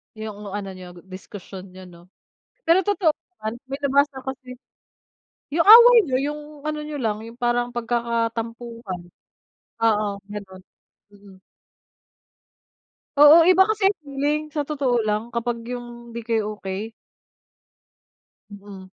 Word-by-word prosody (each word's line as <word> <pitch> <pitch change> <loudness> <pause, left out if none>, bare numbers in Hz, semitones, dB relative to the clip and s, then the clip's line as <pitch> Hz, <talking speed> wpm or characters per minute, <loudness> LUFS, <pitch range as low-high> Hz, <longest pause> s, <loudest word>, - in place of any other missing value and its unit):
'Yung 215 -1 -8
ano 200 -1 -5
niyo, 180 -1 -11 0.2
diskusyon 185 0 -10
niyo 185 - -11
'no. 175 -2 -15 0.6
Pero 340 +3 +5
totoo 385 -5 +1 0.2
naman. 215 -8 -4 0.2
May 270 - -3
nabasa 280 0 +2
kasi 255 -1 -7 1.0
'yung 330 +5 +1
away 475 +3 +10
niyo, 260 - -1 0.2
'yung 300 - -7 0.2
ano 305 0 -3
niyo 300 0 -6
lang, 220 -5 -2
'yung 230 - -12
parang 240 0 -1
pagkakatampuhan. 230 -3 -3 0.8
Oo, 210 -2 +2 0.2
gano'n. 190 -2 -9 0.5
Mm. 200 -2 -17 1.8
Oo, 310 +3 +8
iba 370 +1 +7
kasi 425 -1 +1
ang 400 - +1
feeling, 290 +2 -1
sa 295 -2 -3
totoo 270 -5 0
lang, 215 +2 -2
kapag 235 0 -3
'yung 240 -1 -8
hindi 235 - -6
kayo 220 -2 -2
okey. 195 +4 -5 1.6
Mm. 200 -1 -11
235 Hz, 125 wpm, -23 LUFS, 210-285 Hz, 1.8 s, away